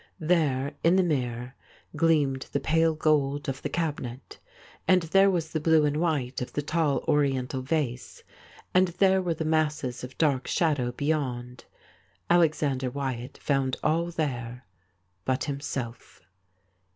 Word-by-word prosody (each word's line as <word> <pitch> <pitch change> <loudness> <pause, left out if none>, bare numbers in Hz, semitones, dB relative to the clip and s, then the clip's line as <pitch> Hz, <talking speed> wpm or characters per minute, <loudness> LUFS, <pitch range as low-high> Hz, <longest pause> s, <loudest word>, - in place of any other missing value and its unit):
There 150 -4 +1
in 170 +2 +5
the 190 - +4
mirror 125 -6 -2 0.4
gleamed 145 -5 +2
the 140 - 0
pale 160 +3 +2
gold 145 -2 +1
of 135 0 -3
the - - -3
cabinet, 145 -7 -4 0.5
and 185 -2 +4
there 195 +4 +4
was 170 -4 -1
the 160 - -1
blue 155 0 +4
and 150 0 0
white 145 -7 -1
of 125 - -5
the 145 - -2
tall 155 -2 0
Oriental 135 -3 +1
vase, 130 -3 -3 0.5
and 185 +1 +5
there 190 +2 +3
were 175 -3 -1
the 160 - -3
masses 150 -6 0
of 125 +1 -8
dark 140 -5 +1
shadow 145 -8 +1
beyond. 125 -3 -3 0.7
Alexander 150 -6 +2
Wyatt 130 -2 -4
found 135 -2 0
all 165 +2 +1
there 125 -7 -4 0.6
but 130 +3 0
himself. 130 -8 -5
145 Hz, 140 wpm, -27 LUFS, 130-160 Hz, 0.7 s, in